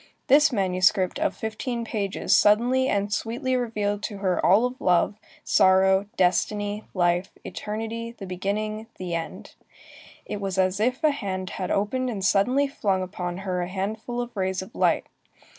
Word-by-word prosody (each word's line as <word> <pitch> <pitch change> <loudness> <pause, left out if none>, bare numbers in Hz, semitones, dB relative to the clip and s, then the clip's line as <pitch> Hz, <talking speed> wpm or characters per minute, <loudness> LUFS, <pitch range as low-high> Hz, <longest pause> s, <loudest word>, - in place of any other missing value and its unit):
This 295 +3 +5
manuscript 185 0 +2
of 315 0 0
fifteen 235 +2 -4
pages 205 -4 0
suddenly 245 +5 +4
and 200 0 0
sweetly 255 +5 -1
revealed 210 -4 -1
to 205 - -6
her 190 -2 0
all 200 +7 +5
of 250 +1 -5
love, 180 +2 +3 0.3
sorrow, 190 +1 +4
destiny, 205 +3 +1
life, 175 +1 +1 0.2
eternity, 225 +2 -5
the 195 - -7
beginning, 210 +4 -3
the 180 -2 -5
end. 165 -1 -5 0.7
It 205 -1 -5
was 195 -1 -3
as 185 +1 +2
if 250 +6 0
a 310 - +5
hand 190 -8 -4
had 185 -1 -4
opened 250 +6 0
and 200 -5 -3
suddenly 250 +9 +3
flung 195 -8 -1
upon 180 -1 -5
her 180 -1 -1
a 175 - -2
handful 215 +6 -4
of 240 -1 -7
rays 190 -1 -1
of 205 - -14
light. - - +2
205 Hz, 160 wpm, -25 LUFS, 190-230 Hz, 0.7 s, This